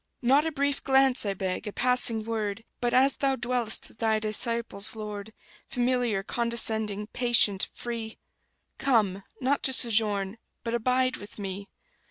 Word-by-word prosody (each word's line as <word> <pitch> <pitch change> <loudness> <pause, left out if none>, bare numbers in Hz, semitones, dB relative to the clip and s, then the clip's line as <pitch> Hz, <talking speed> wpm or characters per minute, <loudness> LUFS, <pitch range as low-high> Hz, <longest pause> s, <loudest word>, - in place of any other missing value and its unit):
Not 275 +6 +4
a - - -2
brief 285 -1 -1
glance, 265 -4 +3
I 195 - -1
beg, 185 +1 -3
a - - -3
passing 245 -2 +2
word, 220 -2 -3 0.2
But, 240 0 0
as 265 +3 +3
Thou 270 -1 +1
dwell'st 235 -2 -1
with - - -20
Thy 220 -1 +2
disciples, 215 -1 0
Lord, 210 -1 -7 0.4
Familiar, 245 -5 0
condescending, 220 -3 0
patient, 230 -5 +3
free, 230 -2 -6 0.6
Come, 210 -7 +1 0.2
not 275 +2 +1
to 265 - +4
sojourn, 215 -4 +2 0.2
but 230 -1 -3
abide 255 +2 +1
with 205 - -12
me! 200 0 -6
230 Hz, 145 wpm, -27 LUFS, 210-250 Hz, 0.6 s, Not